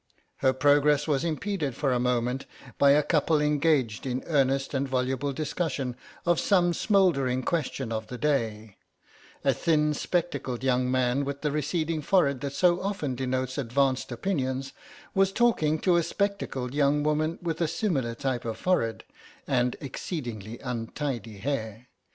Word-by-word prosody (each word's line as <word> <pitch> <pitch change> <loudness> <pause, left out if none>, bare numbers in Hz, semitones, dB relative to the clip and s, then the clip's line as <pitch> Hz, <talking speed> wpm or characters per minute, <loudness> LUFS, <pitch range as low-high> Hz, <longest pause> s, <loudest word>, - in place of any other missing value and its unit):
Her 130 - +3
progress 145 +2 +3
was 145 -1 +1
impeded 165 - -2
for 135 -1 +1
a 125 - +1
moment 125 +1 0 0.3
by 140 - +6
a 145 +2 +5
couple 155 0 +2
engaged 150 -6 +1
in 130 0 -2
earnest 135 -3 +1
and 135 0 0
voluble 130 +2 0
discussion 140 -3 -2 0.3
of 175 -1 +3
some 175 -3 +3
smouldering 145 - +2
question 135 -5 -2
of 110 -1 -3
the 125 - -6
day; 110 -8 -1 0.7
a - - +4
thin 150 -2 +2
spectacled 145 -7 -2
young 125 -1 +2
man 130 +1 +1
with 140 0 -4
the 150 - 0
receding 155 +2 -1
forehead 140 -6 +2
that 140 -1 -3
so 175 +4 +3
often 190 -9 -2
denotes 130 +1 -2
advanced 135 +1 0
opinions, 130 -2 -2 0.4
was 195 0 +3
talking 195 -10 +2
to 180 -2 +4
a - - +4
spectacled 165 -10 -2
young 145 0 +2
woman 155 +2 0
with 165 -1 -3
a 165 - +3
similar 145 - -1
type 125 0 -2
of 115 -1 -4
forehead, 115 -12 0 0.4
and 125 -2 +1
exceedingly 120 - -5
untidy 120 -2 -4
hair. 115 -1 -4
140 Hz, 150 wpm, -27 LUFS, 125-155 Hz, 0.7 s, by